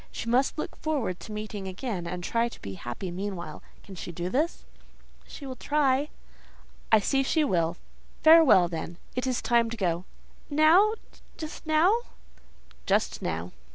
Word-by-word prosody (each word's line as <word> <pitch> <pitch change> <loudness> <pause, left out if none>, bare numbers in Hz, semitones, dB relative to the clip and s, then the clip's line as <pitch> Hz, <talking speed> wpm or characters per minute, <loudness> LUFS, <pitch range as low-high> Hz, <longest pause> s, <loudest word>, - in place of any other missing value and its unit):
She - - -6
must 255 +6 +2
look 305 - -4
forward 270 - -2
to - - -10
meeting 210 -2 -5
again, 190 -2 -4
and 180 +1 -5
try 235 +4 +1
to - - -13
be 100 - -5
happy 120 - -6
meanwhile. 180 -4 -5 0.2
Can 195 - -11
she 180 -1 -6
do 175 +1 -4
this?" 300 - -1 0.6
"She 285 - -9
will 260 -1 -5
try." 285 0 +1 0.8
"I 220 - +8
see 270 +6 +1
she 310 +4 +2
will. 170 - +1 0.5
Farewell, 315 - +7
then. 165 0 -6 0.2
It 250 +1 -1
is 255 -2 -1
time 235 -1 +3
to 235 - -6
go." 175 -3 -1 0.4
"Now?—just 320 0 +1
now? 320 +7 +4 0.9
"Just 205 +2 +1
now." 85 +1 -3
225 Hz, 155 wpm, -27 LUFS, 180-290 Hz, 0.9 s, I